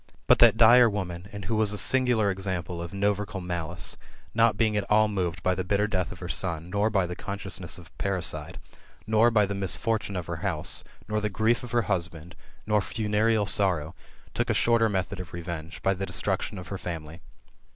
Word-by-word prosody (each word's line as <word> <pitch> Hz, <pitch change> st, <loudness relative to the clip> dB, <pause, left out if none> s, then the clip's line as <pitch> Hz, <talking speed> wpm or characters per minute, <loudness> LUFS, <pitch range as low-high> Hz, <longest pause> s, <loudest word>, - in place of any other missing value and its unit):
But -, -, +5 dB
that -, -, +7 dB
dire 120 Hz, +1 st, +7 dB
woman, 95 Hz, -3 st, -5 dB
and 100 Hz, -2 st, -7 dB
who 110 Hz, -, -1 dB
was 110 Hz, -1 st, +3 dB
a -, -, -3 dB
singular 120 Hz, -4 st, +3 dB
example 95 Hz, -3 st, -3 dB
of 85 Hz, -, -6 dB
novercal 100 Hz, 0 st, -1 dB
malice, 85 Hz, -1 st, -3 dB, 0.4 s
not 115 Hz, 0 st, +3 dB
being 110 Hz, -2 st, +1 dB
at 105 Hz, -, -2 dB
all 110 Hz, 0 st, +4 dB
moved 90 Hz, -4 st, -3 dB
by 95 Hz, -, +2 dB
the 95 Hz, 0 st, -2 dB
bitter 100 Hz, +2 st, +1 dB
death 95 Hz, -4 st, -2 dB
of 90 Hz, -, -8 dB
her 90 Hz, -, -7 dB
son, 85 Hz, -1 st, -2 dB
nor 105 Hz, +2 st, +1 dB
by 95 Hz, -4 st, +1 dB
the 90 Hz, 0 st, -5 dB
consciousness 95 Hz, -4 st, -4 dB
of 85 Hz, -2 st, -15 dB
parri 95 Hz, -2 st, -1 dB
cide, 80 Hz, +2 st, -2 dB, 0.5 s
nor 110 Hz, +2 st, +4 dB
by 105 Hz, -3 st, +3 dB
the 100 Hz, -, -4 dB
misfortune 100 Hz, +2 st, 0 dB
of 90 Hz, -2 st, -3 dB
her 85 Hz, 0 st, -5 dB
house, 80 Hz, -2 st, -1 dB, 0.2 s
nor 105 Hz, 0 st, -1 dB
ihe 105 Hz, -, -1 dB
grief 110 Hz, +4 st, +1 dB
of 125 Hz, -, -7 dB
her 120 Hz, 0 st, +1 dB
husband, 85 Hz, -3 st, -3 dB, 0.3 s
nor 105 Hz, -1 st, +2 dB
funereal 110 Hz, +1 st, 0 dB
sorrow, 90 Hz, -6 st, +2 dB, 0.4 s
took -, -, -1 dB
a -, -, +2 dB
shorter 115 Hz, -1 st, +3 dB
method 95 Hz, 0 st, -2 dB
of 90 Hz, -, -8 dB
revenge, 85 Hz, -1 st, -7 dB
by 95 Hz, -, +3 dB
the 95 Hz, +1 st, -4 dB
destruction 90 Hz, +3 st, 0 dB
of 90 Hz, -3 st, -8 dB
her 100 Hz, -, -5 dB
family. 80 Hz, -1 st, -7 dB
95 Hz, 205 wpm, -27 LUFS, 90-105 Hz, 0.5 s, that